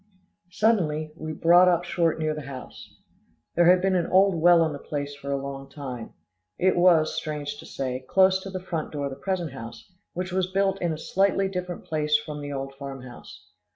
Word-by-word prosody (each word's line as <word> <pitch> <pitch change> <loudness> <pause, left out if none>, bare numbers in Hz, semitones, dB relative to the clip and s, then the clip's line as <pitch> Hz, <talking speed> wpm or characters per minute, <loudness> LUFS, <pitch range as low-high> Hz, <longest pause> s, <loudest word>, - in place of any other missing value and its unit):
Suddenly, 165 -7 +1
we 155 -1 -6
brought 175 +4 +5
up 175 -1 +3
short 170 -2 0
near 155 -1 -1
the 155 - -6
house. 135 -3 -10 0.6
There 175 0 +4
had 180 0 +5
been 190 -1 +2
an 175 -2 +1
old 195 +1 +4
well 170 0 +5
on 160 -2 -1
the 145 - -7
place 145 0 -4
for 140 0 -6
a 140 - +1
long 135 0 -7
time. 130 -5 -7 0.4
It 185 +1 +3
was, 175 -3 +4
strange 145 -2 -4
to - - -11
say, 130 -1 -4
close 190 0 +4
to 195 - -7
the 185 -1 -4
front 165 -4 -4
door 145 -1 -2
of 140 - -3
the - - -6
present 175 -2 -2
house, 115 +4 -10 0.2
which 180 +1 -4
was 185 0 0
built 195 0 +1
in 175 -2 0
a 155 - -3
slightly 195 +3 +1
different 180 -2 -5
place 150 -1 +1
from 150 0 -7
the 145 0 -6
old 135 0 -4
farm 135 -1 -8
house. 105 -5 -12
155 Hz, 210 wpm, -26 LUFS, 140-180 Hz, 0.6 s, brought